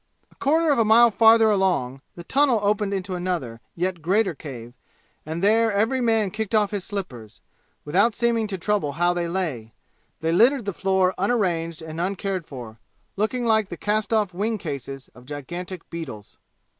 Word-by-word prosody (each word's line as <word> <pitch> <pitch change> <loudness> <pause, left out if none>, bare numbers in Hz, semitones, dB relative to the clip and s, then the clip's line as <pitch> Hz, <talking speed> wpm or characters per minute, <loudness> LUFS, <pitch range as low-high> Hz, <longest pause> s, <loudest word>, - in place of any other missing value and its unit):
A - - -24
quarter 315 +2 +2
of 280 - +2
a - - +5
mile 230 +2 +6
farther 225 +1 +6
along 180 -10 0
the 170 - -9
tunnel 265 +2 +2
opened 205 0 +1
into 190 -1 -3
another, 175 -11 -3
yet 180 0 -2
greater 190 +3 +1
cave, 120 -6 -9 0.5
and 160 +3 -4
there 225 +2 +4
every 225 +6 +1
man 225 -4 +2
kicked 220 +1 -3
off 210 -1 +2
his 205 -3 -3
slippers, 130 - -7 0.5
without 200 +9 +2
seeming 235 -2 +1
to 195 -2 -4
trouble 185 -5 -1
how 175 +3 +2
they 175 -1 -2
lay; 155 -12 -3 0.5
they 160 0 -1
littered 235 +7 +4
the 200 - -2
floor 190 0 +1
unarranged 175 -7 0
and 160 +1 -5
uncared 190 -1 -2
for, 115 -5 -9 0.4
looking 235 +4 -1
like 220 -3 +2
the - - -6
cast 210 0 -1
off 210 -4 +1
wing 215 +5 -1
cases 140 - -7
of 125 0 -17
gigantic 175 +5 -7
beetles. 130 -11 -8
190 Hz, 170 wpm, -24 LUFS, 165-220 Hz, 0.5 s, mile